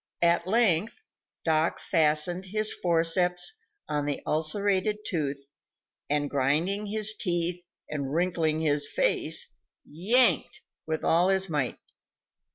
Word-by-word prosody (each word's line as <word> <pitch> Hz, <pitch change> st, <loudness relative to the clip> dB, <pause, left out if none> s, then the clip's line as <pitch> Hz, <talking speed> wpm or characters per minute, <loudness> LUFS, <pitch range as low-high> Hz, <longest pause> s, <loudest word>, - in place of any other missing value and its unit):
At 170 Hz, +1 st, +2 dB
length, 215 Hz, -, +1 dB, 0.5 s
Doc 160 Hz, 0 st, +1 dB
fastened 165 Hz, +2 st, +1 dB
his 215 Hz, +3 st, +2 dB
forceps 175 Hz, -, +1 dB, 0.3 s
on 145 Hz, -1 st, -2 dB
the 145 Hz, -, -3 dB
ulcerated 195 Hz, +6 st, 0 dB
tooth, 140 Hz, -4 st, -4 dB, 0.6 s
and, 145 Hz, 0 st, 0 dB
grinding 155 Hz, +10 st, 0 dB
his 215 Hz, +1 st, +2 dB
teeth 175 Hz, -2 st, -1 dB, 0.2 s
and 140 Hz, -3 st, -4 dB
wrinkling 165 Hz, -1 st, 0 dB
his 145 Hz, -2 st, +1 dB
face, -, -, -1 dB, 0.3 s
yanked 220 Hz, -, +3 dB, 0.3 s
with 160 Hz, 0 st, -3 dB
all 175 Hz, +3 st, +3 dB
his 190 Hz, -1 st, +1 dB
might. 145 Hz, -5 st, -2 dB
170 Hz, 110 wpm, -27 LUFS, 150-190 Hz, 0.6 s, yanked